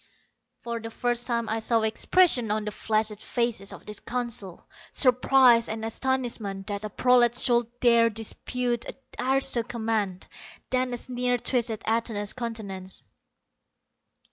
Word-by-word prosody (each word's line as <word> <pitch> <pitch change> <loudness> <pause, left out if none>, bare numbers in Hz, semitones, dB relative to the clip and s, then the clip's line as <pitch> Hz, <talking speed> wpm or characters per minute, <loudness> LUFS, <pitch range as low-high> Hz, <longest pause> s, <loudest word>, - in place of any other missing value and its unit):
For 235 -1 -5
the 225 0 -7
first 240 +1 -1
time 235 -2 -1
I 220 +1 -1
saw 225 0 +1
expression 245 - +3
on 215 0 -1
the 210 - -3
flaccid 215 0 -1
faces 235 -5 -2
of - - -12
the 210 - -7
Council 235 -7 -4 0.2
surprise 255 -2 +4
and 220 0 -4
astonishment 225 -5 -2
that 205 0 -5
a 215 - -4
prolat 240 +2 +3
should 240 -2 +3
dare 235 -1 +5
dispute 240 +2 -2
an - - -7 0.2
aristo 265 -1 +2
command. 220 -5 -3 0.5
Then 255 0 +1
a - - -6
sneer 245 0 -1
twisted 235 -3 +1
Atuna's 220 -2 -1
countenance. 210 -6 -6
230 Hz, 135 wpm, -26 LUFS, 215-245 Hz, 0.5 s, dare